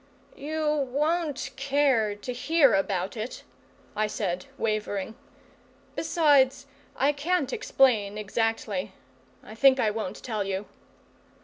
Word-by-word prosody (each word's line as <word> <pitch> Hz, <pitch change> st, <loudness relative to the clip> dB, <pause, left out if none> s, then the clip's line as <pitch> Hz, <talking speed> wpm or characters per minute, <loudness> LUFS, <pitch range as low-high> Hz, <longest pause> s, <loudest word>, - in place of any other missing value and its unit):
"You 300 Hz, -1 st, -1 dB
won't 305 Hz, +1 st, -1 dB
care 270 Hz, -6 st, +2 dB
to 245 Hz, +5 st, -6 dB
hear 285 Hz, +1 st, +3 dB
about 195 Hz, 0 st, 0 dB
it," 225 Hz, +3 st, -6 dB, 0.5 s
I 215 Hz, 0 st, +1 dB
said, 185 Hz, -4 st, -3 dB
wavering. 215 Hz, -1 st, -2 dB, 0.8 s
"Besides, 285 Hz, -5 st, +3 dB, 0.3 s
I 275 Hz, +2 st, +3 dB
can't 295 Hz, -1 st, -1 dB
explain 215 Hz, -6 st, +2 dB
exactly. 210 Hz, -2 st, -2 dB, 0.5 s
I -, -, -11 dB
think 265 Hz, +3 st, +5 dB
I 215 Hz, -, +2 dB
won't 215 Hz, -2 st, -5 dB
tell 215 Hz, -4 st, -2 dB
you." 195 Hz, +1 st, -3 dB
245 Hz, 110 wpm, -27 LUFS, 210-285 Hz, 0.8 s, think